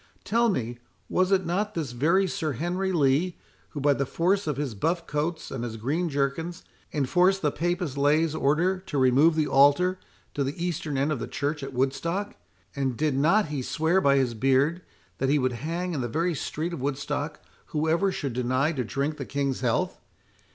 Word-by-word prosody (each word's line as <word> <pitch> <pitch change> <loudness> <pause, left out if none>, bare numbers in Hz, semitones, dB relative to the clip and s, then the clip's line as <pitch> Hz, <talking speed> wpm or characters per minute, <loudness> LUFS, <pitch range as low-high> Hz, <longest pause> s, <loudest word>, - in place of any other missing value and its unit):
Tell 235 +2 +2
me, 120 - -2 0.3
was 185 +1 +2
it 190 -2 +3
not 205 +5 -1
this 150 -7 -2
very 165 +11 +2
Sir 165 -6 -2
Henry 180 +8 -1
Lee, 155 +2 +2 0.3
who, 150 - -6
by 145 +1 +4
the 140 - -1
force 190 +6 +1
of 150 -3 -1
his 140 -5 -2
buffcoats 160 - -2
and 125 -3 -4
his 115 -2 -5
greenjerkins, 150 +5 -1 0.3
enforced 180 +7 +2
the 150 - +2
Papist 175 -4 -2
Laie's 150 +2 +3
order 160 +6 +1
to 185 -6 -5
remove 135 +5 +5
the 155 -1 +2
altar 145 +8 +4 0.3
to 140 - 0
the 135 +3 -3
eastern 155 -4 -2
end 140 +3 +1
of 145 - -1
the - - -4
church 145 +1 -2
at 135 0 -6
Woodstock?—and 135 - -3
did 150 -3 +1
not 165 +7 +3
he 145 -3 -2
swear 160 +8 +1
by 140 -3 +4
his 130 -3 +2
beard, 135 +8 +2 0.4
that 135 - +1
he 145 - +4
would 130 -2 +1
hang 170 +8 -3
in 145 - -2
the 120 - -1
very 170 +6 0
street 160 +3 -3
of 160 - -5
Woodstock 145 +2 -3 0.3
whoever 160 +5 +1
should 140 -8 -3
deny 130 +5 +1
to 135 -6 -2
drink 140 +6 -2
the 135 - -5
King's 140 -2 -1
health? 120 -3 0
150 Hz, 185 wpm, -26 LUFS, 135-175 Hz, 0.4 s, remove